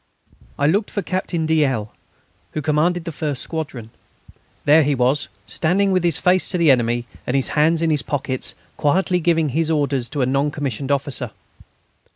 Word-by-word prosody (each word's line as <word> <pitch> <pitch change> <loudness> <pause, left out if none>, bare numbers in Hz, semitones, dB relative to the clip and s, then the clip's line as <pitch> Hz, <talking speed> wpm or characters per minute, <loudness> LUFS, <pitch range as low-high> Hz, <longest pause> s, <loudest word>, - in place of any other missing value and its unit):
I 140 - +1
looked 200 +8 +2
for 200 - -3
Captain 175 -2 -2
de 160 -1 +3
L., 115 -7 -2 0.6
who 155 - -2
commanded 165 +3 +1
the 165 - -3
first 145 -3 -3
squadron. 140 -9 -5 0.7
There 150 +2 +6
he 145 -1 +1
was, 130 +3 +1 0.2
standing 195 +4 +1
with 185 -2 +2
his 170 -3 +2
face 185 0 +2
to 180 - 0
the 165 -4 +5
enemy, 120 -1 +1 0.2
and 125 - 0
his 135 - +2
hands 160 +2 +2
in 165 - +2
his 150 -3 +2
pockets, 130 -7 -3 0.2
quietly 180 +5 +2
giving 165 -2 +2
his 160 +4 0
orders 140 -6 0
to 140 0 -1
a - - +3
non 135 +3 +1
commissioned 140 -2 -3
officer. 140 -2 -1
150 Hz, 180 wpm, -21 LUFS, 135-165 Hz, 0.7 s, There